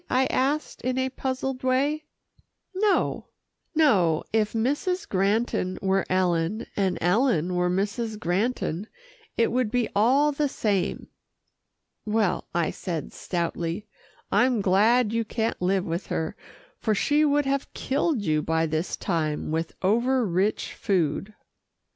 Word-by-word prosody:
I 260 +1 +3
asked 285 +4 0
in 255 0 -1
a 260 0 +1
puzzled 260 0 -3
way. 280 +4 +1 0.7
"No, 400 +1 +1 0.5
no. 190 - +3
If 215 -1 +1
Mrs. 290 +11 0
Granton 195 -1 0
were 195 0 +1
Ellen, 180 +2 +1
and 190 -3 +1
Ellen 180 - +2
were 180 0 +1
Mrs. 210 +4 -1
Granton, 195 0 -1 0.5
it 230 - +3
would 250 -2 +1
be 245 0 0
all 265 +8 +4
the 290 +1 0
same." 200 -7 -1 0.9
"Well," 210 -4 0
I 170 -2 0
said 165 -4 -5
stoutly, 170 +2 -3 0.5
"I'm 250 -2 +3
glad 215 +4 +3
you 230 0 +1
can't 225 -1 -2
live 190 +1 +1
with 170 +3 -3
her, 160 0 -2 0.4
for 215 -2 +1
she 295 +8 +2
would 290 -1 +2
have 275 0 -1
killed 280 -3 0
you 155 -4 +1
by 160 +1 +1
this 160 +2 -2
time 155 -5 -1
with 160 +1 -2
over 240 +6 +2
rich 190 +3 0
food." 190 +1 -1
215 Hz, 130 wpm, -26 LUFS, 180-255 Hz, 0.9 s, all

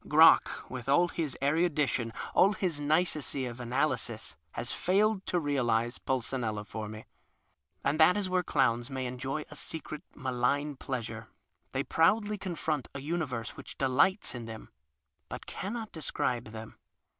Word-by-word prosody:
Crock, - - +6
with 130 0 -6
all 175 +5 +5
his 155 -6 -3
erudition, 145 -6 +2 0.2
all 200 +2 +6
his 180 -6 -1
nicety 150 -3 +1
of 120 0 -6
analysis, 125 +2 -1 0.2
has - - -2
failed 200 +2 +2
to 180 - +2
realize 120 -5 +1
Puleinella 120 -4 -2
for 110 0 -5
me. 110 +1 -8 0.8
And 145 +3 +1
that 170 +5 +7
is 200 -2 +1
where 185 0 +2
clowns 120 -7 +1
may 130 -1 -3
enjoy 135 +4 -3
a - - -8
secret, 155 0 -5
malign 140 +2 0
pleasure; 115 -4 -5 0.4
they - - 0
proudl}' 210 +5 +2
confront 160 -6 -2
a - - -3
universe 140 -7 -2
which 140 - -9
delights 140 +9 +2
in 120 -2 -6
them 110 -1 -9 0.6
but - - -6
cannot 220 +2 -5
describe 125 -6 -1
them. 110 0 -9
140 Hz, 145 wpm, -30 LUFS, 120-165 Hz, 0.8 s, that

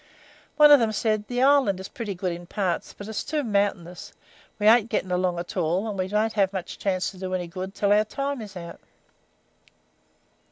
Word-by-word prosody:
One 300 -1 +8
of 290 - +9
them 225 -2 +1
said: 215 -1 -1
'The 245 +1 0
island 270 -9 +4
is 190 - -7
pretty 210 -5 -6
good 180 0 -2
in 175 0 -8
parts, 185 -2 -2
but 205 - -10
it's 220 - -3
too 300 -1 -2
mountaynyus; 200 -5 -2 0.4
we 210 - -2
ain't 225 +1 +5
getting 190 -4 -2
along 180 -1 0
at 175 0 -6
all, 180 +4 0
and 210 - -4
we 185 -1 -2
won't 215 +3 0
have 195 -3 +2
much 190 -3 -6
chance 185 -2 -1
to 190 - -14
do 185 0 -3
any 180 -1 -2
good 185 +2 -6
until 200 +1 +1
our 210 +1 +4
time 275 +3 -4
is 200 -3 -9
out.' 170 -1 -9
200 Hz, 205 wpm, -25 LUFS, 185-220 Hz, 0.4 s, of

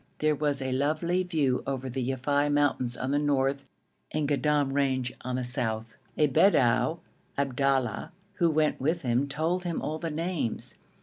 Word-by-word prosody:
There 155 0 +2
was 145 -2 -1
a 130 - -2
lovely 155 +7 +1
view 155 -8 +1
over 135 -1 -2
the 130 +1 -3
Yafei 140 +3 +1
mountains 140 -4 +1
on 130 +2 -2
the 145 - +2
north 140 -1 +1 0.5
and 150 -1 0
Goddam 145 -1 +1
range 130 -3 0
on 125 0 -2
the 130 - -1
south. 115 -3 -3 0.2
A 155 - +5
Bedou, 140 - +4 0.4
Abdallah, 135 -3 0 0.3
who 170 -2 +3
went 155 -3 +1
with 160 +4 0
him 125 +2 +1
told 165 +6 -1
him 175 -2 -2
all 155 +1 -3
the 165 - -3
names. 160 -5 -2
140 Hz, 165 wpm, -28 LUFS, 130-155 Hz, 0.5 s, A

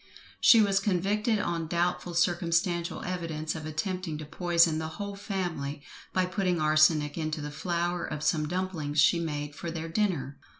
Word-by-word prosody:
She 230 - +7
was 195 -1 +2
convicted 205 +3 +1
on 170 -5 -2
doubtful 175 +1 -1
circumstantial 170 0 +1
evidence 165 -4 -3
of 155 -1 -6
attempting 175 0 -3
to 155 - -7
poison 170 0 +2
the 160 - -3
whole 200 -1 -5
family, 175 -8 -4 0.3
by 185 -1 +1
putting 180 -1 0
arsenic 155 0 +3
into 155 0 -2
the 150 0 -5
flour 175 +2 -2
of 150 -1 -4
some 155 -1 +1
dumplings 165 -4 -2
she 170 +4 +5
made 150 -3 -3
for 170 - -6
their 165 0 -5
dinner. 165 -7 -1
170 Hz, 160 wpm, -28 LUFS, 155-185 Hz, 0.3 s, She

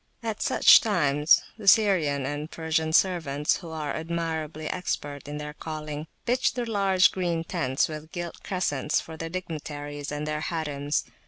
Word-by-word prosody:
At 220 -2 -3
such - - +7
times 150 -7 +3 0.2
the 205 - -8
Syrian 180 - +4
and 145 +2 -4
Persian 160 -1 -1
servants, 160 -5 +2
who 170 - -9
are 155 -2 -3
admirably 160 -2 -3
expert 145 -6 -4
in 145 0 -5
their 150 0 -6
calling, 155 -1 -6 0.2
pitch 255 +2 +1
the 245 -1 -2
large 195 -4 +3
green 170 -3 -1
tents, 140 -7 0
with 155 0 -8
gilt 175 -2 -6
crescents, 150 -6 0
for 160 - -8
the 165 +1 -5
dignitaries 145 -4 -5
and 150 0 -3
their 150 0 -2
harims. 150 -3 -2
160 Hz, 155 wpm, -26 LUFS, 150-175 Hz, 0.2 s, such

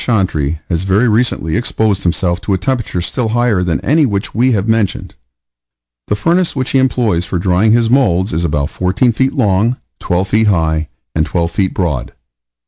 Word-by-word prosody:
Chantrey, 80 - 0
has 85 -2 -1
very 95 +6 +2
recently 110 -8 0
exposed 110 -3 0
himself 85 0 -1
to 100 -1 0
a - - 0
temperature 105 -3 -2
still 115 +7 -2
higher 120 -4 +1
than 85 -3 -1
any 155 +3 +2
which 100 -3 -3
we 125 +3 +2
have 100 0 -1
mentioned. 110 -3 -1 0.9
The - - 0
furnace 170 - +1
which 130 -2 -2
he 135 - +3
employs 120 -9 +1
for 90 +1 -3
drying 95 +4 +2
his 115 -1 +3
moulds 110 -7 +2
is 80 +2 -1
about 75 -2 -1
14 95 +7 +1
feet 130 +3 0
long, 105 +5 +1 0.2
12 90 +2 -1
feet 110 +3 +2
high, 80 -5 +1 0.3
and 80 - +1
12 85 +1 -1
feet 95 +1 -1
broad. 75 -10 -2
100 Hz, 180 wpm, -15 LUFS, 85-120 Hz, 0.9 s, he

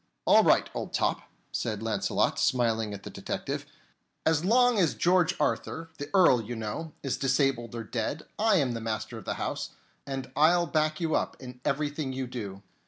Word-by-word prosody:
"All - - +7
right, - - +4
old - - -5
top," - - 0 0.2
said 110 -2 -2
Launcelot, 105 -3 0
smiling 115 -4 +1
at 100 -1 -7
the - - -7
detective. - - -4 0.6
"As 160 -1 +3
long 245 +3 +4
as 170 -5 +2
George 175 -1 +3
Arthur, 165 0 -1
the 145 +1 -5
Earl, 180 -11 +5
you 115 +2 -6
know, 115 +9 -5
is 135 -3 -1
disabled 135 -3 +1
or 115 - -4
dead, 115 +7 -3 0.2
I 220 -1 +4
am 140 -8 +2
the 115 -1 -4
master 110 +1 -3
of 105 - -13
the - - -2
house, - - -4 0.3
and 135 -2 -4
I'll 170 +3 +5
back 155 0 0
you 165 -2 0
up - - 0
in 125 -1 -10
everything 145 -1 -1
you 130 0 -3
do." 100 -6 -6
135 Hz, 180 wpm, -28 LUFS, 115-160 Hz, 0.6 s, All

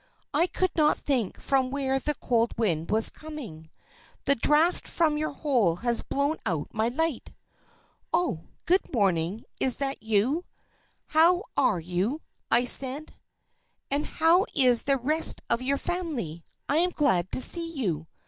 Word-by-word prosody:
"I 345 - +3
could 370 0 -1
not 300 -2 +3
think 250 -8 -1
from 265 -2 0
where 270 -1 -1
the 300 +2 -2
cold 235 -2 -1
wind 170 -8 -1
was 220 +1 +4
coming. 235 - -10 0.5
The 280 - +3
draught 300 +7 +2
from 320 -3 +1
your 310 +1 -2
hole 245 - +1
has 235 +5 +1
blown 285 +3 -1
out 160 -5 -3
my 220 +1 0
light." 305 +2 -2 0.8
"Oh! 330 - -1 0.2
Good 370 +3 +1
morning! 195 - 0
Is 255 - +3
that 275 -3 -3
you? 225 - 0 0.7
How 345 +4 +4
are 185 - +2
you?" 185 - -2 0.4
said 270 +4 +2
I. - - -16
"And 295 - -2
how 345 +6 +3
is 250 -4 +6
the 275 -1 +1
rest 305 +6 +1
of 235 - +2
your 275 +2 0
family? 275 - -4 0.2
I 290 - +1
am 355 +2 +3
glad 245 - +1
to - - 0
see 335 +5 +2
you. 180 - -3
270 Hz, 150 wpm, -26 LUFS, 220-310 Hz, 0.8 s, is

